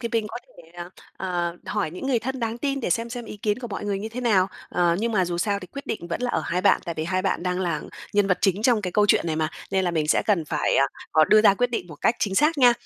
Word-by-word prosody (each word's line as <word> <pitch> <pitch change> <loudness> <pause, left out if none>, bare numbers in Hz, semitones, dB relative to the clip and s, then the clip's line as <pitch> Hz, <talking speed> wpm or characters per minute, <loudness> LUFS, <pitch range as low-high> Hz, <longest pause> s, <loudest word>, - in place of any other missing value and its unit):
thì 235 - -3
mình 225 -2 +1
có - - -6
thể 210 -9 -17
là 175 0 -8 0.3
à, 175 -2 -1
hỏi 205 -6 -1
những 180 +10 -6
người 260 -3 +2
thân 260 +3 -4
đáng 230 0 -2
tin 275 +1 -1
để 230 - -2
xem 230 +7 0
xem 240 -1 -5
ý 210 - -8
kiến 210 +1 -1
của 245 -2 -6
mọi 205 - -5
người 200 -1 -1
như 215 +3 -5
thế 235 +3 -6
nào. 200 -6 +3 0.2
Ờ, 175 -1 +2
nhưng 230 +2 -1
mà 190 -4 +2
dù 175 0 -3
sao 200 +2 0
thì 185 - -9
quyết 280 +8 -9
định 170 - -4
vẫn 170 - -3
là 250 - 0
ở - - 0
hai 180 +2 -1
bạn, 200 - +4
tại 170 - -4
vì 155 - -3
hai 185 +2 -1
bạn 190 -3 -1
đang 180 0 -1
là 170 -5 -1 0.3
nhân 205 -1 +3
vật 180 -2 +1
chính 195 +2 +1
trong 235 -3 +3
cái 180 -2 -3
câu 210 +2 +3
chuyện 195 - +3
này 155 -1 -1
mà, 155 -1 0 0.2
nên 190 -1 +1
là 175 - +1
mình 155 -3 -1
sẽ - - +3
cần 195 -7 +2
phải, 150 0 0
à, 135 - +4 0.3
ờ, 155 0 +6
đưa 215 +5 +5
ra 200 - +6
quyết 245 +4 0
định 225 -7 -3
một 155 - -11
cách 230 - +3
chính 195 -2 -1
xác 300 +8 +3
nha. 245 -2 +7
200 Hz, 315 wpm, -24 LUFS, 175-230 Hz, 0.3 s, nha